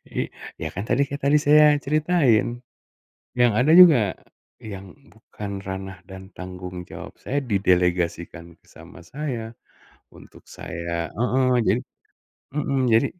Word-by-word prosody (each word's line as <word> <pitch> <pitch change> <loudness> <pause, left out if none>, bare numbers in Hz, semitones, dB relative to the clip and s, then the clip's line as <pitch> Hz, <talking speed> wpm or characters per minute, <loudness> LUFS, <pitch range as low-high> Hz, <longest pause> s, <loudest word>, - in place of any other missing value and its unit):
I - - -2 0.3
ya - - -2
kan 100 - -3
tadi 135 +3 +3
kita 140 0 -3
tadi 145 - +4
saya 150 0 +6
ceritain, 140 -6 +1 0.8
yang 120 -2 +5
ada 145 +5 +3
juga 150 - +7 0.5
yang 100 -3 -9 0.2
bukan 105 -2 -9
ranah 95 -1 -7
dan 95 0 -11
tanggung 90 -1 -8
jawab - - -10
saya 145 - -2
didelegasikan 90 -4 -1
sama - - -15
saya, 120 - -5 0.6
untuk - - -16
saya 85 0 -5
heeh 125 +2 +1
jadi - - +2 0.8
mhm, 140 -2 -1
jadi 115 +5 +4
110 Hz, 125 wpm, -23 LUFS, 90-140 Hz, 0.8 s, juga